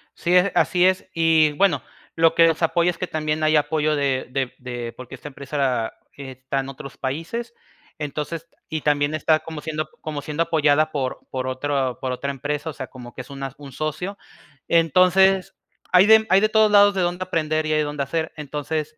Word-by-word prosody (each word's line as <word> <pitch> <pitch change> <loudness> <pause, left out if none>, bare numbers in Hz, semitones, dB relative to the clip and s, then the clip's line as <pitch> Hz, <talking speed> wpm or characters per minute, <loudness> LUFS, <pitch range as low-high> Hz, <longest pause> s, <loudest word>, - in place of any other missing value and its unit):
Sí, 175 +1 -1
e 180 +2 +5
así 180 0 +3
es. 185 0 +2
Y 160 -2 +4
bueno, 195 +3 +2 0.3
lo 165 0 +4
que 165 0 +6
nos 165 +1 0
apoya 170 +1 +2
es 170 - -3
que 185 - -3
también 155 0 -2
hay 155 0 +3
apoyo 155 0 +1
de 140 -2 0
de 130 -1 -2
de 120 -2 -6
porque 130 +1 -10
esta 130 - -10
empresa 135 -4 -2 0.2
está 135 0 -5
en 135 - -7
otros 135 0 -9
países, 165 - -4 0.4
entonces 150 +2 -5 0.2
y 155 -1 -3
también 145 0 +1
está 155 0 +2
como 160 -1 -8
siendo 155 0 -4
como 150 -2 -5
siendo 155 +3 -1
apoyada 155 -1 +2
por 130 -3 -2
por 130 0 -3
otro 130 -1 -1
por 130 -1 -2
otra 140 +2 -3
empresa, 145 +3 -4
o - - -6
sea, 130 +1 -7
como 120 -2 -11
que - - -7
es 125 - -14
una 135 -1 -6
un 140 -3 -11
socio, 155 +7 -4 0.5
entonces 185 +3 +4 0.4
hay 180 +2 +7
de, 220 0 +7
hay 190 - +6
de 215 - +3
todos 220 -1 +4
lados 205 0 +6
de 190 - +1
dónde 180 +1 -1
aprender 155 -3 -1
y 155 - 0
hay 155 - +2
dónde 145 -1 -3
hacer, 160 +3 -2
entonces 150 +1 -4
155 Hz, 200 wpm, -22 LUFS, 140-165 Hz, 0.5 s, hay